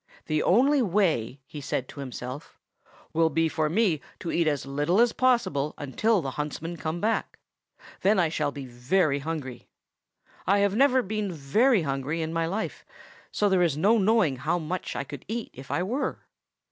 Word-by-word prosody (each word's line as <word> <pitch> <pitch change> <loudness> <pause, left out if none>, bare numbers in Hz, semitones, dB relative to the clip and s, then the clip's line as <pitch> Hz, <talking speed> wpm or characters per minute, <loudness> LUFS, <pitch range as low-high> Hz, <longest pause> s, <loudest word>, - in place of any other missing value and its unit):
"The 155 -1 0
only 270 +8 +4
way," 165 - +1
he 145 +1 -9
said 130 -1 -2
to - - -10
himself, 130 +1 -7 0.6
"will 165 0 +3
be 165 +2 +2
for 155 -1 0
me 175 -4 +2 0.2
to 170 - -4
eat 170 -1 +1
as 145 -3 0
little 145 +8 +1
as 240 0 +4
possible 195 - +1
until 185 - +1
the 135 - -3
huntsmen 160 +3 -5
come 160 +2 -3
back; 220 +4 -1 0.6
then 205 +2 +4
I 175 -3 +3
shall 155 -2 -1
be 140 -2 -7
very 140 +5 +1
hungry. 140 -5 -5 0.8
I 200 +2 +4
have 200 0 +2
never 260 0 +4
been 210 -1 -2
very 185 - +2
hungry 140 +3 -2
in 160 +1 -4
my 165 0 0
life, 205 +6 -4 0.5
so 210 - +1
there 190 -2 +3
is 165 -5 +2
no 215 +8 +4
knowing 200 - +3
how 155 +7 0
much 175 +2 -4
I - - -2
could 140 -1 -9
eat 230 +1 -4
if 135 +1 -11
I 175 - 0
were." 245 +9 -3
165 Hz, 180 wpm, -27 LUFS, 145-205 Hz, 0.8 s, only